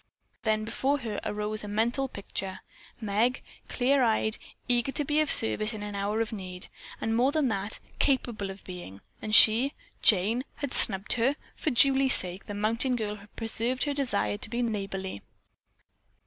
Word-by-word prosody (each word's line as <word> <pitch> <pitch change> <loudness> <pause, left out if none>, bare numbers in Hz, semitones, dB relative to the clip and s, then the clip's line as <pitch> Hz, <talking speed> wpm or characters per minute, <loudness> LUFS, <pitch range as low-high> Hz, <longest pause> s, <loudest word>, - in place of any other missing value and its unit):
Then 215 -1 0
before 270 +5 -1
her 220 -3 -4
arose 210 +1 -3
a - - -6
mental 235 +6 0
picture. 195 -4 -5 0.4
Meg, 220 +3 0 0.3
clear 270 +2 +2
eyed, 220 -2 +2 0.3
eager 245 +2 +1
to 295 - -2
be 295 +2 +1
of 305 -2 +2
service 215 - +3
in 210 - -6
an 205 0 -6
hour 200 +2 -1
of 225 0 -3
need, 185 -3 -6 0.3
and 225 0 -1
more 250 +4 +3
than 290 -4 +1
that, 205 -1 -3 0.2
capable 240 -7 0
of 195 0 -9
being, 175 - -9 0.2
and 215 0 +2
she, 235 +5 +7 0.3
Jane, 215 +5 +3
had 285 -3 -5
snubbed 195 -1 +3
her, 250 +4 +1 0.2
but - - -25
for 310 - +3
Julie's 270 0 +5
sake 180 +1 -5
the 205 - -5
mountain 230 +5 0
girl 210 -3 -3
had 200 0 -18
persevered 230 +3 0
in 290 - -1
her - - 0
desire 105 - -1
to - - -1
be 240 +2 -1
neighborly. 195 - -4
220 Hz, 175 wpm, -28 LUFS, 200-250 Hz, 0.4 s, she